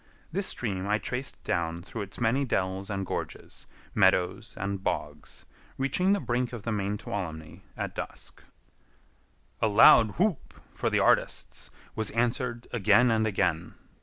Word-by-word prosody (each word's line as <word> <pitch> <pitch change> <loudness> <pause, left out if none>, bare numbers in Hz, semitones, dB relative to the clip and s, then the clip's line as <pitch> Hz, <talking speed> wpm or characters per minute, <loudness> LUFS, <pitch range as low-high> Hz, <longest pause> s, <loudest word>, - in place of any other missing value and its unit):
This 195 +4 0
stream 100 -5 -2
I 105 +1 +2
traced 125 +4 -4
down 85 0 -2
through 110 - -6
its 100 -1 -7
many 120 +4 +2
dells 95 -5 -1
and 95 -2 -2
gorges, - - -6 0.3
meadows 95 +1 +2
and 100 0 -3
bogs, - - -4 0.3
reaching 140 +8 +1
the 205 - +1
brink 125 -4 -1
of 115 -4 -6
the 115 - -2
main 100 -1 -1
Tuolumne 80 -7 -6 0.2
at - - -3
dusk. - - -8 1.2
A - - +4
loud 110 +1 +7
whoop 190 -4 0 0.2
for - - -1
the - - +1
artists - - +1 0.3
was 110 -1 -1
answered 120 +1 -1
again 115 +2 +4
and 110 -1 +2
again. 105 - -1
110 Hz, 145 wpm, -28 LUFS, 95-120 Hz, 1.2 s, loud